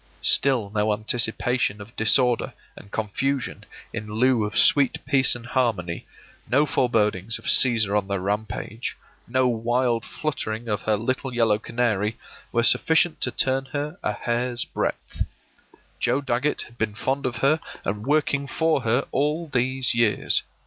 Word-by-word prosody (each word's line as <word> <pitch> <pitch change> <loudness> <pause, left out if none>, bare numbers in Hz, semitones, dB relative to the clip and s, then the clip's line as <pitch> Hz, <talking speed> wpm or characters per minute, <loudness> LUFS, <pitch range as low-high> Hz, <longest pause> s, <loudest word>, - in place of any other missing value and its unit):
Still 125 -7 +3
no 105 0 +1
anticipation 110 0 0
of 100 +3 -12
disorder 120 +2 +2 0.2
and 100 - -14
confusion 120 +6 -2 0.3
in 105 -2 -6
lieu 120 0 +2
of 105 - -4
sweet 140 -2 +5
peace 135 -3 +4
and 120 -1 -9
harmony, 115 -10 -1 0.4
no 140 +5 +4
forebodings 110 -6 +1
of - - -15
Cæsar 110 -5 +4
on 100 -2 0
the 100 -1 -1
rampage, 105 +3 -4 0.3
no 130 +1 +2
wild 120 0 0
fluttering 120 -7 -4
of 105 -2 -1
her 110 -1 +1
little 130 +4 -2
yellow 110 -3 +3
canary, 110 -2 -1 0.3
were 115 - +1
sufficient 160 +4 +3
to - - +1
turn 130 +2 +1
her 150 +6 -5
a 105 - -1
hair's 120 +2 -2
breadth. - - -3 0.8
Joe 125 +3 +1
Dagget 135 +2 0
had 120 - -16
been 105 -2 -1
fond 135 +4 -1
of 125 - -4
her 140 +6 +2 0.3
and 105 +2 -2
working 145 -1 +1
for 160 +2 +1
her 120 +3 0
all 150 +4 -1
these 130 -1 +1
years. 115 -3 +2
120 Hz, 150 wpm, -24 LUFS, 110-135 Hz, 0.8 s, sweet